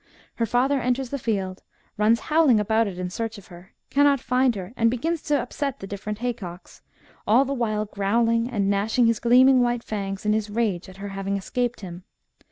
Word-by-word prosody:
Her 230 - 0
father 260 +4 +1
enters 250 +1 -1
the 280 - -3
field, 195 -5 -2 0.3
runs 220 +2 +3
howling 300 -7 +3
about 220 +2 +1
it 185 -3 -6
in 180 0 -4
search 225 +2 -4
of 200 - -14
her, 175 +2 -14 0.2
cannot 285 -1 +4
find 255 -1 +1
her, 190 +2 -7
and 230 -1 +3
begins 315 +7 -2
to 295 -1 +1
upset 275 +2 -3
the - - -7
different 205 +1 -5
haycocks, 215 -7 -6 0.5
all 240 +6 +5
the 275 - -2
while 215 -4 -1
growling 230 +4 +1
and 205 -6 -1
gnashing 205 +5 +2
his 230 -1 +2
gleaming 255 +2 +5
white 240 -1 0
fangs 195 -2 -4
in 210 - +3
his 215 -1 -1
rage 205 -5 -1
at 190 - -13
her 200 +1 -6
having 195 0 -3
escaped 240 +4 -2
him. 180 -2 -8
225 Hz, 195 wpm, -24 LUFS, 200-245 Hz, 0.5 s, all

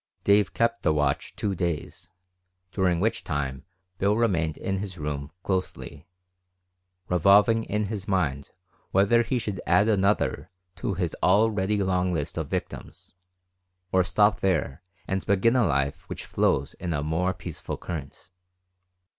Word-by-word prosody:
Dave 100 0 +3
kept 115 0 +1
the 80 - +2
watch 75 -2 -1
two 100 -2 -1
days, 85 -1 -4 0.6
during 90 -3 +1
which 110 +5 0
time 70 -4 -3 0.3
Bill 100 +2 +2
remained 85 -9 +1
in 95 0 -2
his 95 -2 -5
room 75 -2 -4
closely, 90 -4 -4 1.0
revolving 100 +6 +4
in 105 0 -1
his 100 -1 -5
mind 75 -8 -1 0.4
whether 100 +5 +4
he 120 +2 -1
should 105 -5 -3
add 105 - +4
another 105 -1 +1 0.3
to 95 +1 -2
his 90 -4 -2
already 105 0 +3
long 90 -1 +1
list 80 -5 -3
of - - -3
victims, - - -6 0.8
or 95 0 +4
stop 105 +4 +3
there 90 -6 0 0.3
and 95 0 -1
begin 100 +5 +3
a 125 -4 +3
life 70 0 -1
which - - -6
flows 70 +1 0
in 85 -2 -3
a 75 -2 -1
more 80 +4 0
peaceful 90 - -6
current. 80 -4 -8
95 Hz, 140 wpm, -26 LUFS, 80-105 Hz, 1.0 s, revolving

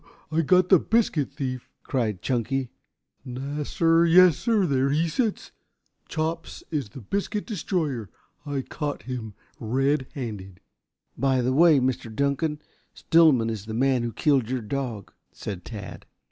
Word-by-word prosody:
"I 155 - -2
I - - +5
got 180 +3 +3
the 190 - +7
biscuit 190 - +1
thief!" 130 -3 -4
cried 110 -9 -2
Chunky. 130 +1 -1 0.5
"Nassir. 150 +6 +1
Yassir. 185 - +5
There 135 -2 +1
he 155 +4 +1
sits. 215 +6 -2 0.6
Chops 165 +1 -3
is 145 -9 -2
the 130 - -10
biscuit 200 - -2
destroyer. 160 - -2 0.3
I 140 -2 -3
caught 145 +1 -4
him 115 -5 -6 0.2
red 135 +4 0
handed." 100 -8 -6 0.6
"By 135 -2 +1
the 130 +2 +1
Way, 160 0 +6
Mr. 130 -2 -1
Dunkan, 140 +5 -1 0.3
Stillman 145 -9 +4
is 110 -2 -6
the 110 - -4
man 130 0 +2
who 120 0 -2
killed 130 0 +1
your 130 -1 -1
dog," 115 -2 -4 0.2
said 95 -4 -7
Tad. 105 -5 -9
135 Hz, 140 wpm, -25 LUFS, 120-160 Hz, 0.6 s, the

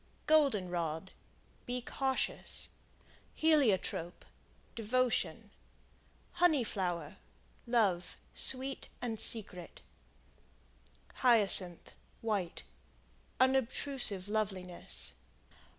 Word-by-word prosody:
Golden 280 -12 +2
Rod 170 0 -5 0.6
Be 250 0 -3
cautious. 265 +2 -3 0.7
Heliotrope 230 - 0 0.5
Devotion. 240 +2 -2 0.8
Honey 320 -7 +1
Flower 175 -8 -5 0.5
Love, 200 -7 -1 0.2
sweet 265 +1 +1
and 225 -3 -5
secret. 185 -6 -2 1.3
Hyacinth, 205 -8 +5 0.3
White 200 -6 -4 0.8
Unobtrusive 260 -5 +5
loveliness. 190 -4 -5
220 Hz, 60 wpm, -31 LUFS, 185-260 Hz, 1.3 s, Hyacinth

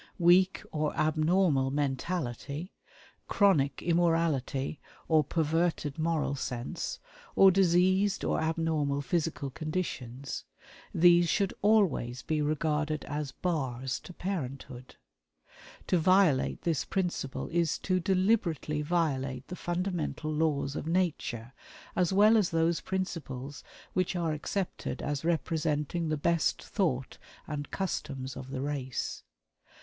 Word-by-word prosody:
Weak 180 +2 +4
or 150 -1 -1
abnormal 155 -2 +2
mentality; 145 - -3 0.5
chronic 170 -9 +3
immorality 165 -5 +1 0.3
or 155 -2 +4
perverted 160 -1 0
moral 160 -3 0
sense; 125 -3 -4 0.4
or 195 -1 +8
diseased 190 +2 +3
or - - +1
abnormal 160 -3 0
physical 150 -1 -1
conditions 140 -5 -4 0.5
these 175 0 +5
should 200 +1 +1
always 190 - +2
be 155 -2 0
regarded 155 0 0
as 145 -1 -3
bars 130 -7 -2
to - - -11
parenthood. 140 -9 -5 0.9
To 180 - +2
violate 185 -5 +3
this 165 -5 +1
principle 175 -8 -2
is 170 -2 +1
to 185 -1 +1
deliberately 185 - +1
violate 140 -6 -1
the 180 - -4
fundamental 175 -3 -2
laws 150 -3 0
of - - -4
Nature, 150 -9 -1 0.4
as 180 -1 +2
well 210 +3 +6
as 205 -5 +2
those 165 +1 +1
principles 145 -8 -4 0.3
which 185 0 0
are 170 -2 0
accepted 180 +5 -3
as 145 0 -2
representing 160 0 0
the 155 - 0
best 170 +2 +1
thought 135 - -1 0.3
and 145 -2 -5
customs 135 -8 -3
of 130 0 -8
the 135 -1 -4
race. 135 -3 -3
160 Hz, 115 wpm, -30 LUFS, 140-175 Hz, 0.9 s, or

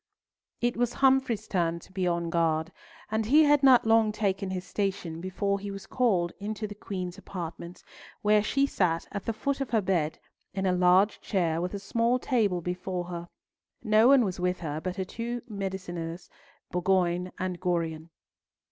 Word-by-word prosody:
It 240 0 0
was 245 0 +1
Humfrey's 265 -4 +2
turn 170 -3 0
to - - -17
be 185 -1 -1
on 170 -1 -1
guard, 165 -1 +1 0.4
and 220 0 0
he 300 +6 +6
had 290 -1 +4
not 260 -4 +6
long 225 -1 +4
taken 195 -3 -1
his 185 -1 -4
station 185 -6 -3
before 200 +2 -1
he 200 +1 -6
was 195 0 -7
called 190 -9 +1
into 215 +1 -4
the 205 - -6
Queen's 185 -3 -6
apartments, 175 -1 -7 0.4
where 210 0 +5
she 275 +6 +2
sat 170 -10 0
at 200 -2 -5
the - - 0
foot 275 +5 -2
of 270 - -2
her 225 - +3
bed, 175 -5 0 0.4
in 195 0 -1
a 185 - +3
large 180 +3 +4
chair 170 -5 0
with 180 +3 -3
a - - -4
small 230 +4 +1
table 215 -9 +1
before 180 +1 -3
her. 170 -1 -6 0.5
No 215 0 +5
one 265 -3 +6
was 185 -3 -3
with 180 0 -1
her 155 -1 -3
but 185 +1 -3
her 190 - -2
two 235 +4 -5
mediciners, 185 -4 -5 0.4
Bourgoin 180 0 +1
and 180 -1 -3
Gorion. 165 -3 -1
190 Hz, 175 wpm, -28 LUFS, 175-220 Hz, 0.5 s, he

